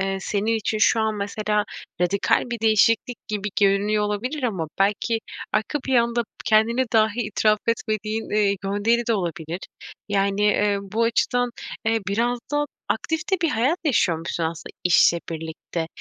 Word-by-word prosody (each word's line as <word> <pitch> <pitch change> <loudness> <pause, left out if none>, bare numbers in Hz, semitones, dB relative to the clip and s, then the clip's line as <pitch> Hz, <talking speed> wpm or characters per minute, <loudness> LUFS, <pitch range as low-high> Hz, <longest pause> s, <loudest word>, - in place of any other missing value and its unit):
eee, 195 0 -1
senin 215 +3 0
için 215 0 -2
şu 225 - +4
an, 220 -1 0
mesela, 210 +1 -1 0.4
radikal 180 +3 +2
bir 235 - -3
değişiklik 225 +2 +2
gibi 210 -1 -2
görünüyor 205 +1 +3
olabilir 250 +8 -3
ama 190 -10 -1
belki 210 +3 +1 0.3
arka 255 +7 0
planda 235 -2 +2 0.2
kendine 225 +4 +3
dahi 220 +1 +3
itiraf 215 0 +2
etmediğin, 220 -1 -1
eee, 205 -1 +2
gönderi 215 +4 +1
de 230 - +2
olabilir. 170 -2 -3 0.5
Yani, 200 0 +1
eee, 210 -1 +3
bu 210 +4 -2
açıdan, 245 +1 +1 0.3
eee, 225 0 +2
biraz 225 +4 +1 0.2
da 295 0 +2 0.2
aktif 320 +8 -1
de - - +5
bir 330 - +3
hayat 270 +8 +1
yaşıyormuşsun 170 - +1
aslında 165 0 -5
işle 170 -1 +5
birlikte. 160 +1 -5
215 Hz, 145 wpm, -23 LUFS, 200-230 Hz, 0.5 s, de